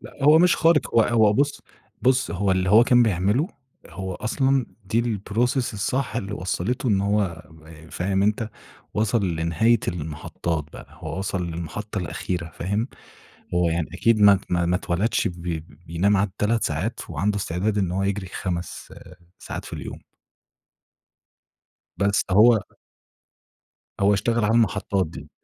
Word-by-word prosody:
.ث - - -23
لأ 140 - -7
هو 150 +2 +7
مش 180 +1 +4
خارق 165 -2 +2
هو 115 - +6
هو 110 -2 +4
بُص 140 +5 0 0.4
بُص 130 -4 +2
هو 95 +3 0
اللي 95 0 +1
هو 115 +3 +7
كان 125 -1 +5
بيعمله 105 - +1 0.4
هو 95 +1 -6
أصلًا 135 +4 0 0.2
دي 115 +5 +1
الprocess 115 +3 -1
الصح 120 +1 -1
اللي 100 -3 -3
وصّلته 100 +7 -2
إن 100 -3 +2
هو 100 -4 0
ب 80 0 -15
فاهم 95 +2 0
أنت؟ 105 +2 0 0.4
وصَل 110 -1 +1
لنهاية 85 +8 +2
المحطّات 80 0 -3
بقى - - -10
هو - - -7
وصَل 95 -2 -2
للمحطة 90 +6 -5
الأخيرة 90 -1 -4
فاهم؟ 100 +7 -1 0.7
هو 90 -1 +2
يعني 80 -1 -1
أكيد 115 +4 +2
ما 100 0 +8
ات 95 - -4
ما 85 0 +2
اتولدش 90 +5 0
ب 85 -1 -8
ب 80 -3 -5
بينام 95 +5 +2
عادي 95 0 0
3 115 +2 +1
ساعات 85 +10 -2
وعنده 100 +7 -1
استعداد 100 +3 -1
إن 95 -4 0
هو 95 +2 -1
يجري 100 -1 -2
5 90 -2 -4
آآ - - -14 0.2
ساعات - - -7
في - - -9
اليوم. - - -7 2.0
بس 100 0 +2
هو 110 +4 +6 1.4
هو 100 +1 +4
اشتغل 115 +2 0
على 110 +2 +2
المحطّات 100 -4 +1
دي. 80 - -10
100 Hz, 155 wpm, -24 LUFS, 90-115 Hz, 2.0 s, ما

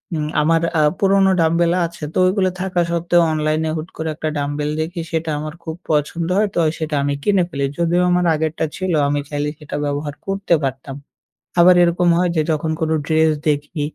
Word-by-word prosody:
উম 155 -1 -2 0.2
আমার 165 +2 +2 0.2
আ - - +4 0.2
পুরোনো 195 0 +4
dumbbell 170 +1 +2
আছে, 170 0 -9
তো - - -3
ওইগুলো 185 0 +2
থাকা 185 -1 -1
সত্ত্বেও 170 +1 +2
অনলাইনে 155 +1 0
হুট 155 +2 -5
করে 160 0 -3
একটা 155 0 -3
dumbbell 145 +1 -2
দেখি, 170 +2 -3
সেটা 165 -1 -2
আমার 155 0 -5
খুব 160 -1 -5
পছন্দ 155 +2 0
হয়, 210 - +3
তো - - +1 0.2
সেটা 155 -1 -2
আমি 140 0 0
কিনে 200 -3 +3
ফেলি। 140 -3 -3
যদিও 170 +1 +2
আমার 180 0 +2
আগেরটা 160 +1 -1
ছিল, 185 0 -2 0.2
আমি 145 0 0
চাইলে 145 0 -2
সেটা 150 -1 -7
ব্যবহার 145 0 -3
করতে 195 -2 -1
পারতাম। 135 0 -4 0.7
আবার 180 +1 +7
এরকম 175 +1 +2
হয় 180 - +2
যে, - - +3
যখন 155 0 -1
কোনো 160 0 0
ড্রেস 160 0 +3 0.2
দেখি, 150 +2 -1
160 Hz, 190 wpm, -19 LUFS, 150-175 Hz, 0.7 s, আবার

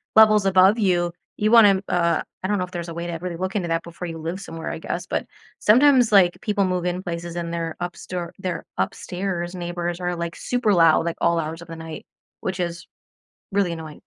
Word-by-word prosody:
levels 215 -2 +7
above 190 +3 +5
you. 175 -5 +2 0.3
You 210 +1 +1
wanna, 205 -5 +7
uh 170 -1 +2 0.2
I 190 - 0
don't 205 - +2
know 180 - 0
if 180 - -17
there's 170 -2 -5
a 165 - -6
way 170 +1 -4
to 170 - -3
really 175 -2 -4
look 185 +2 -3
into 180 -5 -1
that 165 0 0
before 170 +1 -7
you 165 - -6
live 165 +5 -5
somewhere, 165 -3 -6
I - - -5
guess, 175 +2 -4
but - - -2 0.3
sometimes, 250 +1 +5
like, 185 -4 +5
people 205 -2 +1
move 180 -1 -1
in 180 +1 -1
places 170 -1 -5
and 170 -1 -3
their 165 -1 -3
up 175 0 -4
store 175 -2 -6
their 185 -2 -4
upstairs 175 - -3
neighbors 175 0 -3
are, 175 0 -1
like, 170 0 -4
super 245 -4 0
loud, 165 -2 +5
like, 170 - -2
all 170 0 +3
hours 165 +1 -4
of 170 - -12
the 165 - -7
night, 160 -1 -8 0.4
which 190 -1 -3
is 170 -1 -3 0.7
really 195 -3 +2
annoying. 160 -2 -8
175 Hz, 220 wpm, -23 LUFS, 170-190 Hz, 0.7 s, levels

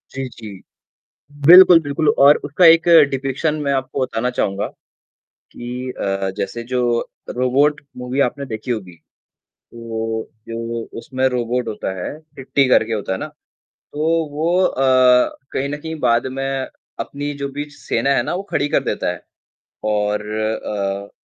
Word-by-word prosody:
जी, 135 -1 -3
जी। 105 -5 -11 0.9
बिल्कुल, 180 -1 +10
बिल्कुल 145 +1 0 0.2
और 145 - +7
उसका 150 +5 +2
एक 165 +1 +6 0.2
डिपिक्शन 135 +3 -1
मैं 140 - +1
आपको 130 0 -3
बताना 125 -1 -1
चाहूँगा 100 -5 -1 0.9
कि 125 +1 -6
अ, 95 -1 -1
जैसे 115 +5 -4
जो 125 -1 +1 0.5
रोबोट 140 +4 +1 0.2
मूवी 125 +2 -4
आपने 140 +2 -1
देखी 115 0 -5
होगी। 95 -7 -5 0.8
वो 115 -1 -4 0.2
जो 115 0 -4 0.2
उसमें 130 +2 -1
रोबोट 125 -1 -2
होता 105 -3 -4
है, 150 - -5 0.2
चिट्टी 135 0 +1
करके 115 -2 +3
होता 105 -3 -3
है - - -3
ना - - -4 0.7
तो 150 +1 -3 0.3
वो 170 +5 +1
अ, 130 -3 +3
कहीं 140 +1 -1
न 145 - -3
कहीं 160 +2 -6
बाद 120 0 +2
में 135 -1 -2 0.3
अपनी 145 +1 -4
जो 140 - -1
भी 145 - -2
सेना 140 -1 -2
है - - +2
ना - - -3
वो 185 - -3
खड़ी 145 - 0
कर - - +1
देता - - -1
है। - - -9 0.7
और 105 0 0
अ, 100 -2 -3
125 Hz, 150 wpm, -19 LUFS, 110-140 Hz, 0.9 s, बिल्कुल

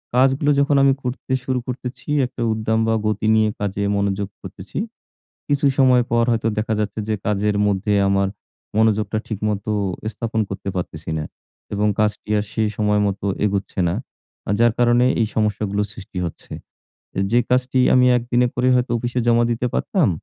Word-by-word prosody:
কাজগুলো 135 +3 +3
যখন 140 +1 +3
আমি 135 -1 +5
করতে 125 +1 -5
শুরু 130 -1 -1
করতেছি 125 +2 -6 0.2
একটা 125 0 -7
উদ্দাম 110 0 0
বা 115 - +2
গতি 105 0 0
নিয়ে 110 -1 +3
কাজে 100 0 -2
মনোযোগ 100 0 -1
করতেছি, 95 0 -9 0.7
কিছু 145 0 +1
সময় 130 -2 +5
পর 120 0 +3
হয়তো 115 -1 0
দেখা 110 +1 0
যাচ্ছে 105 0 -2
যে 110 - +1
কাজের 105 0 +1
মধ্যে 105 +1 0
আমার 100 0 +2 0.5
মনোযোগটা 110 0 +2
ঠিকমতো 105 -1 -2 0.4
স্থাপন 110 +1 -2
করতে 95 0 -5
পারতেছি 80 -3 -4
না 75 - -2 0.5
এবং 105 +1 +1
কাজটি 105 0 0
আর 105 - -1
সে 110 - 0
সময়মতো 105 -2 +1 0.2
এগোচ্ছে 100 -1 -2
না 85 - 0 0.5
আ - - +2
যার 120 -1 +4
কারণে 120 +1 +4 0.2
এই 110 - +2
সমস্যাগুলো 105 -1 0
সৃষ্টি 100 -3 -10
হচ্ছে। 85 - -8 0.7
এ - - -3
যে 120 - +5
কাজটি 130 +1 +2 0.2
আমি 125 0 +5
একদিনে 120 +1 +1
করে 125 +1 +1
হয়তো 125 -1 +1
অফিসে 120 +1 -2
জমা 120 0 +4
দিতে 120 +2 -1
পারতাম 180 - +1
110 Hz, 165 wpm, -21 LUFS, 105-125 Hz, 0.7 s, আমি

